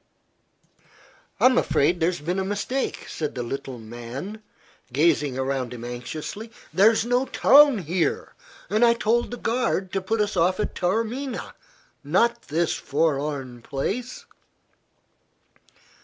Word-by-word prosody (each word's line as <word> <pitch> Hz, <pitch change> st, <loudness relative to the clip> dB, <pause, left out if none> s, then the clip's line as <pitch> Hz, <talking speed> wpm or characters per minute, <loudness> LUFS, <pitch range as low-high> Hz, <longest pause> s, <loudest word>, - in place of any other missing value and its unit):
"I'm 255 Hz, -1 st, +5 dB
afraid 170 Hz, +5 st, +2 dB
there 165 Hz, -, +3 dB
has 175 Hz, -4 st, -5 dB
been 175 Hz, +5 st, -1 dB
a -, -, 0 dB
mistake," 205 Hz, +7 st, -2 dB
said 155 Hz, -2 st, -4 dB
the 125 Hz, -, -3 dB
little 130 Hz, +1 st, -5 dB
man, 120 Hz, -, -7 dB, 0.5 s
gazing 145 Hz, -1 st, +2 dB
around 130 Hz, -2 st, -2 dB
him 120 Hz, 0 st, -8 dB
anxiously. 150 Hz, -, -6 dB, 0.2 s
"There's 215 Hz, +6 st, +4 dB
no 245 Hz, +2 st, +2 dB
town 285 Hz, -3 st, +6 dB
here, 175 Hz, -1 st, -1 dB, 0.3 s
and 215 Hz, +3 st, +2 dB
I 235 Hz, 0 st, +6 dB
told 235 Hz, +1 st, +1 dB
the 245 Hz, -, -6 dB
guard 225 Hz, -6 st, -1 dB
to 195 Hz, -, 0 dB
put 220 Hz, +4 st, -1 dB
us 210 Hz, -1 st, 0 dB
off 180 Hz, +2 st, +2 dB
at -, -, -1 dB
Taormina 230 Hz, +8 st, -2 dB, 0.5 s
not 235 Hz, +11 st, +1 dB
this 165 Hz, +2 st, +1 dB
forlorn 145 Hz, -4 st, -1 dB
place." 235 Hz, -, -4 dB
180 Hz, 125 wpm, -24 LUFS, 140-225 Hz, 0.5 s, town